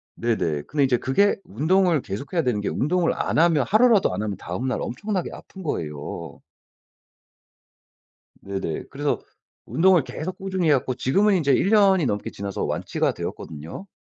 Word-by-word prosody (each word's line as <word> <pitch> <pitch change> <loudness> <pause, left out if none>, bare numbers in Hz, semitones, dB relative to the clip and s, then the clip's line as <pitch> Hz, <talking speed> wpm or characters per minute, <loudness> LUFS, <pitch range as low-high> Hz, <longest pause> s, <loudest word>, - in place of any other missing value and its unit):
네네. 85 -11 -1
근데 145 - 0
이제 130 -2 +3
그게 200 +13 +2
운동을 165 - +2
계속해야 140 - -3
되는 125 -8 0
게 105 - -1
운동을 170 +4 +1
안 - - -2
하면 160 -3 +4
하루라도 215 - +4
안 95 - -2
하면 105 -2 -2
다음날 125 +9 -3
엄청나게 195 - -3
아픈 190 - -11
거예요. 75 - -5 2.0
네네. 95 -5 -4
그래서 145 +1 -1 0.5
운동을 180 -1 +4
계속 165 +7 -6
꾸준히 190 -3 -1
해 - - +6
갖고 130 -1 0
지금은 195 +12 +2
이제 145 -5 +2
1 160 +8 +3
년이 195 -6 +5
넘게 105 -4 -2
지나서 100 0 -4
완치가 - - -1
되었거든요. 80 - -7
145 Hz, 340 characters per minute, -24 LUFS, -, 2.0 s, 해